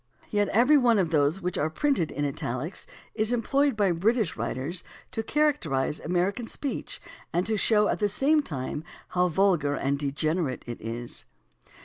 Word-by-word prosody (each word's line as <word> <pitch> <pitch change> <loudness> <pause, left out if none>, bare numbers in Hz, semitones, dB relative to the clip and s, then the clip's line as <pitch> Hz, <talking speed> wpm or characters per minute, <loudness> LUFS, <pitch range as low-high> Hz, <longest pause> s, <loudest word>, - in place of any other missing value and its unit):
Yet 205 -1 +2
every 250 +9 +5
one 240 -3 +4
of 175 -5 +1
those 155 +4 +2
which 180 0 -2
are 155 - +1
printed 265 - +1
in 145 - -2
italics 140 +4 -3 0.3
is 220 +1 +1
em 240 -2 0
ployed 275 +1 +2
by 200 -3 +2
British 205 +2 +1
writers 130 +9 -2 0.3
to 225 - -2
characterize 215 - +1
American 180 +7 -1
speech 280 +3 -4 0.3
and 175 +2 0
to 220 +2 0
show 210 0 +3
at - - -1
the 205 -1 +2
same 295 +9 +3
time 150 - -4 0.3
how 180 0 +2
vulgar 170 -5 +2
and 140 0 -1
degenerate 145 +1 -1
it 120 -1 -7
is. 115 +2 -4
180 Hz, 165 wpm, -27 LUFS, 145-225 Hz, 0.3 s, every